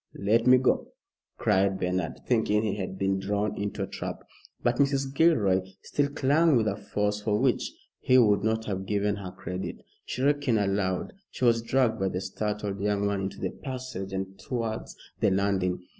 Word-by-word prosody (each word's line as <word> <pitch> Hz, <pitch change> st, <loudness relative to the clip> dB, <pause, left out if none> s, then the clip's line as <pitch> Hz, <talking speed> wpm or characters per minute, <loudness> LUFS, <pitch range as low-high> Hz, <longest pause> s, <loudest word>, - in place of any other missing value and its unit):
"Let 115 Hz, +4 st, +2 dB
me 130 Hz, 0 st, +8 dB
go," 130 Hz, 0 st, +1 dB, 0.5 s
cried 95 Hz, 0 st, +2 dB
Bernard, 90 Hz, -2 st, -2 dB
thinking 110 Hz, -3 st, +2 dB
he 105 Hz, -3 st, 0 dB
had 95 Hz, -2 st, -4 dB
been 95 Hz, 0 st, +1 dB
drawn 100 Hz, +2 st, -1 dB
into 100 Hz, 0 st, -3 dB
a -, -, -3 dB
trap. -, -, -6 dB, 0.4 s
But 120 Hz, 0 st, +2 dB
Mrs. 140 Hz, -1 st, +1 dB
Gilroy 115 Hz, -, +4 dB, 0.2 s
still 145 Hz, -1 st, 0 dB
clung 145 Hz, +2 st, +3 dB
with 110 Hz, -3 st, +2 dB
a -, -, 0 dB
force 105 Hz, 0 st, -2 dB
for 105 Hz, -1 st, +1 dB
which -, -, +1 dB, 0.3 s
he 130 Hz, -, +4 dB
would 105 Hz, -5 st, +4 dB
not 110 Hz, 0 st, 0 dB
have 95 Hz, -2 st, -3 dB
given 105 Hz, 0 st, 0 dB
her 95 Hz, -2 st, -6 dB
credit. 90 Hz, 0 st, -6 dB, 0.2 s
Shrieking 140 Hz, -2 st, +1 dB
aloud 95 Hz, -2 st, 0 dB, 0.2 s
she 130 Hz, -, -2 dB
was 115 Hz, -1 st, +4 dB
dragged 115 Hz, -1 st, +1 dB
by 95 Hz, 0 st, +1 dB
the 90 Hz, -, -2 dB
startled 105 Hz, 0 st, -3 dB
young 100 Hz, 0 st, +1 dB
man 100 Hz, -1 st, 0 dB
into 95 Hz, 0 st, -4 dB
the -, -, -2 dB
passage 130 Hz, -8 st, -6 dB
and 95 Hz, 0 st, -4 dB
towards 115 Hz, -3 st, -4 dB, 0.2 s
the -, -, +3 dB
landing. 95 Hz, -2 st, 0 dB
105 Hz, 175 wpm, -27 LUFS, 95-120 Hz, 0.5 s, me